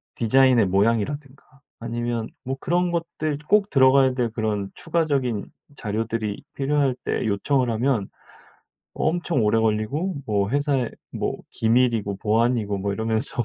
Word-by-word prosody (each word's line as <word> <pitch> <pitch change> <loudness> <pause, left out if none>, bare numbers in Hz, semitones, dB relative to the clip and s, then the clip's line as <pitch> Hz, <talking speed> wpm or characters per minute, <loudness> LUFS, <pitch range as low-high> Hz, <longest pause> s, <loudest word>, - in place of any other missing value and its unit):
디자인의 125 -1 +4
모양이라든가 115 +8 0 0.3
아니면 115 0 -3 0.2
뭐 135 +1 -3
그런 175 +3 0
것들 165 -3 -2
꼭 205 0 +3
들어가야 130 -1 +5
될 120 -3 0
그런 110 -3 -2
추가적인 140 -10 -1 0.3
자료들이 110 0 -3
필요할 140 -2 +1
때 - - -1
요청을 125 +5 +1
하면 115 -2 0 0.8
엄청 170 -7 0
오래 110 +2 +3
걸리고 110 - 0
뭐 100 -2 +1
회사의 140 -3 0 0.2
뭐 - - -2
기밀이고 115 -3 +1
보안이고 110 0 +1
뭐 100 +1 -2
이러면서 110 +3 0
120 Hz, 305 characters per minute, -23 LUFS, 110-140 Hz, 0.8 s, 들어가야